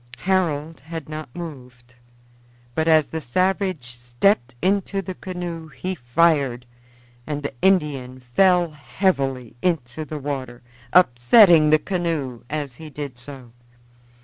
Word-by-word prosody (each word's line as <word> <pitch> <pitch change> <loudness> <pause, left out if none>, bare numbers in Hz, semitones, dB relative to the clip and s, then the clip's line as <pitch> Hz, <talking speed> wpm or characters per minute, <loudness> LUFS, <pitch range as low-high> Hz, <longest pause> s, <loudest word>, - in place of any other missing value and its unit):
Harold 165 -4 0
had 160 +1 -7
not 155 -2 -6
moved, 125 -8 -9 0.8
but 160 +5 0
as 155 -2 +5
the 160 +2 -5
savage 185 +2 0
stepped 120 - 0
into 195 +2 0
the 190 -1 -4
canoe 175 -3 -6
he 180 +6 -4
fired, 135 -3 +1 0.6
and 145 -1 -3
the 140 - -4
Indian 145 -9 +1
fell 175 +7 +3
heavily 135 - -1
into 155 -5 -1
the 155 0 -6
water, 130 -4 -5 0.3
upsetting 160 - +6
the 155 - +6
canoe 155 -8 -3
as 145 -3 -3
he 155 - -8
did 145 -2 -6
so. 125 -1 -10
150 Hz, 120 wpm, -22 LUFS, 130-175 Hz, 0.8 s, upsetting